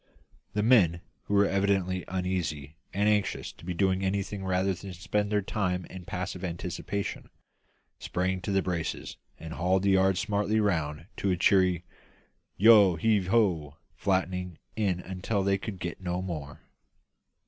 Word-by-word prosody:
The 105 - 0
men, 95 -8 +4 0.2
who 105 - -1
were 100 0 +5
evidently 95 -2 +1
uneasy, 85 -6 -3 0.2
and 100 +2 +1
anxious 105 -2 0
to - - -19
be 90 +1 -4
doing 95 +1 +1
anything 100 +1 -2
rather 95 +1 +1
than 95 +1 -8
spend 105 +4 -1
their 105 -1 +1
time 90 -3 -1
in 90 -1 -9
passive 90 +1 -4
anticipation, 90 +3 -4 0.7
sprang 95 +1 -1
to 100 - -3
the 95 0 +2
braces 85 -3 -3 0.2
and 80 0 -8
hauled 95 +3 +1
the 100 - +3
yards 95 -1 +3
smartly 105 0 +1
round 80 -7 0
to 100 - 0
a 90 - +1
cheery 90 -1 +3 0.7
"Yo 105 -4 +7
heave 100 +2 +2
ho;" 90 -9 +1 0.2
flattening 90 -2 -1 0.2
in 95 -5 0
until 95 +3 -2
they 100 0 +2
could 100 -2 -6
get 85 0 -5
no 90 -1 -2
more. 80 -6 -6
95 Hz, 150 wpm, -28 LUFS, 90-100 Hz, 0.7 s, Yo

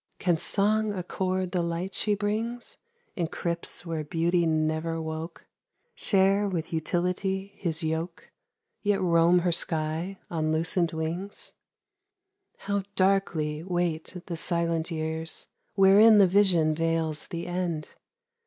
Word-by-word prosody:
Can 175 -3 +1
Song 210 +3 +1
accord 185 0 -2
the 180 - 0
light 170 +3 -3
she 210 -1 +1
brings 220 +4 -3 0.4
In 170 -3 -1
crypts 170 +1 -2
where 165 -2 -3
Beauty 170 +3 +1
never 155 +1 0
woke? 160 +1 -6 0.5
Share 195 - +2
with 170 -3 -4
Utility 180 +4 -1
his 170 -4 -2
yoke, 160 +2 -4 0.5
Tet 205 -1 +2
roam 170 0 +4
her 175 - +3
sky 165 +3 -1
on 155 -2 -1
lucent 165 +2 +1
wings? 165 +5 -5 1.0
How 200 0 -2
darkly 180 -6 +1
wait 175 -1 -2
the 170 - -4
silent 170 0 -1
years 160 0 -3 0.3
Wherein 205 +3 +7
the 200 - +7
Vision 180 -5 +4
veils 165 -1 -1
the 170 0 -5
End! 175 -3 -3
170 Hz, 120 wpm, -27 LUFS, 160-190 Hz, 1.0 s, Wherein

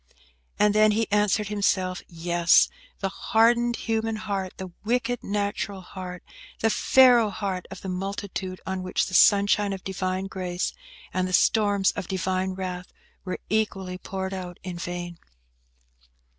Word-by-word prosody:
And 210 0 +4
then 215 0 +5
he 225 0 +1
answered 210 0 +2
himself. 190 -3 0
Yes!–the 175 - +1
hardened 235 +4 +2
human 225 -1 -1
heart, 195 -3 -3
the 190 -1 -7
wicked 245 +2 0
natural 200 -1 -2
heart, 180 -1 -8 0.4
the 225 - +2
Pharaoh 245 -4 +5
heart 195 -3 -4
of 190 -1 -9
the - - -7
multitude, 190 0 -4
on 190 0 -3
which 185 0 0
the 185 - -8
sunshine 205 +1 +5
of 190 - -7
Divine 185 0 -2
Grace 185 -2 -3 0.4
and 185 0 0
the 185 - -5
storms 205 -1 +3
of 195 -4 -6
Divine 185 0 -1
wrath 180 -1 -5 0.3
were 185 - -4
equally 190 -3 -1
poured 190 0 -4
out 180 -2 -6
in 180 -2 -6
vain. 175 -1 -5
195 Hz, 140 wpm, -26 LUFS, 185-210 Hz, 0.4 s, then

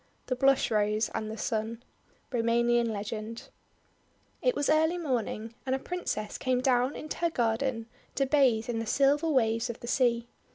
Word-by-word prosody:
THE 255 - -1
BLUSH 270 -1 +3
ROSE 215 0 +1
AND 215 -1 -3
THE 220 - -6
SUN 225 +2 -3 0.5
Roumanian 235 0 +2
Legend 215 +2 -5 0.9
IT - - +2
was 285 - 0
early 320 +3 +3
morning, 235 -7 -2
and 260 0 0
a - - 0
Princess 270 -9 -4
came 255 -1 +1
down 255 +1 +2
into 310 - -6
her 340 - +1
garden 235 -2 0 0.3
to 275 - +2
bathe 260 -6 +3
in 235 -2 -2
the 225 - -4
silver 285 +6 +3
waves 230 -3 +2
of 235 - -5
the - - -9
sea. 240 -2 +1
240 Hz, 165 wpm, -29 LUFS, 225-275 Hz, 0.9 s, BLUSH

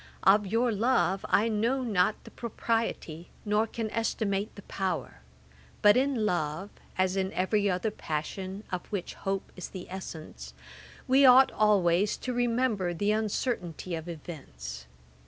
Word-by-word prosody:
Of 200 +1 +5
your 230 +4 +2
love 200 -4 +2
I 215 - +4
know 230 +5 +1
not 210 -3 +1
the - - -12
propriety, 225 -8 -3 0.2
nor 210 +2 +2
can 225 -1 -4
estimate 210 -3 -1
the 200 - -11
power; 185 - -3 0.6
but 205 0 +8
in 260 -4 +2
love, 175 0 -1 0.3
as 185 0 +2
in 190 0 0
every 200 +2 +1
other 185 +4 0
passion, 190 +4 -4
of 180 -1 -4
which 200 -4 -4
hope 195 0 -3
is 180 - -7
the 185 -2 -7
essence, 175 -4 -8 0.5
we 265 +2 +5
ought 260 0 +8
always 200 -2 +3
to 250 - -4
remember 235 -7 +1
the 205 +4 +1
uncertainty 210 - -2
of 165 +1 -4
events. 65 - -8
200 Hz, 140 wpm, -29 LUFS, 180-225 Hz, 0.6 s, but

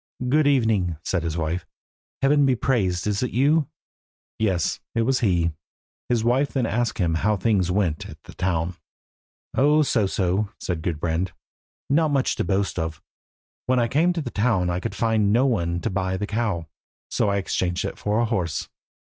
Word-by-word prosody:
"Good 150 +2 +4
evening," 110 - +2
said 90 - 0
his 80 -1 -3
wife. 85 +2 -2 0.6
"Heaven 145 +1 +4
be 135 -2 +3
praised. 100 -9 0
Is 105 -1 0
it 125 - 0
you?" 145 +4 +2 0.7
Yes, 95 -7 0 0.2
it 115 - +2
was 130 +2 +2
he. 85 -7 +2 0.6
His 120 -3 +2
wife 130 +5 +2
then 130 -4 +1
asked 120 +2 -1
him 85 -4 +1
how 100 +6 +1
things 95 -3 +1
went 90 -5 0
at - - -10
the - - -12
town. 90 -1 -1 0.8
"Oh, 150 +3 +4
but - - +2
so 110 -7 +2
so," 95 +2 0
said 85 -3 -3
Gudbrand, 85 +2 -1 0.5
"not 155 +3 +3
much 140 -2 +1
to - - 0
boast 100 -2 0
of. 80 -1 -3 0.7
When 130 0 +3
I 120 -1 +3
came 160 +8 +2
to 170 - -2
the 125 -5 -5
town 100 -5 +1
I 85 - -1
could - - -4
find 110 -3 +2
no 120 +5 +4
one 85 -9 0
to - - -2
buy 95 0 -1
the 105 - -2
cow, 105 -6 -1 0.5
so - - +1
I 100 - +1
exchanged 90 -2 -1
it - - -5
for 105 +2 0
a - - +2
horse." 90 - -2
105 Hz, 185 wpm, -24 LUFS, 90-125 Hz, 0.8 s, Good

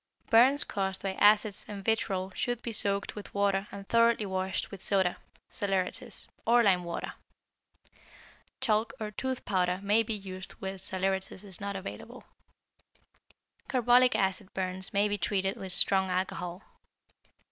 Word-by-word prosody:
Burns 260 +5 +6
caused 190 -1 -2
by 195 -1 -1
acids 210 +1 +4
and 200 -2 -7
vitrol 195 -4 0
should 245 +2 -2
be 235 - -3
soaked 200 -2 0
with 210 - -9
water 200 0 +1
and 195 0 -9
thoroughly 230 -2 +3
washed 190 0 -2
with 195 -2 -9
soda 190 -3 +2 0.3
(saleratus) 195 -2 -3 0.2
or 235 +1 +5
lime 185 -4 +3
water. 170 -1 -4 1.5
Chalk 220 0 +1
or 215 -1 -4
tooth 260 +4 -4
powder 180 -2 +1
may 205 +3 +4
be 225 0 -2
used 190 -1 -7
when 195 0 -6
saleratus 190 +1 -2
is 195 -1 -6
not 200 0 -3
available. 195 0 -8 1.5
Carbolic 250 -1 +4
acid 190 0 0
burns 185 0 -1
may 205 0 +3
be 205 0 -2
treated 195 +1 0
with 190 -1 -6
strong 190 +1 +3
alcohol. 180 0 -3
195 Hz, 140 wpm, -30 LUFS, 190-215 Hz, 1.5 s, Burns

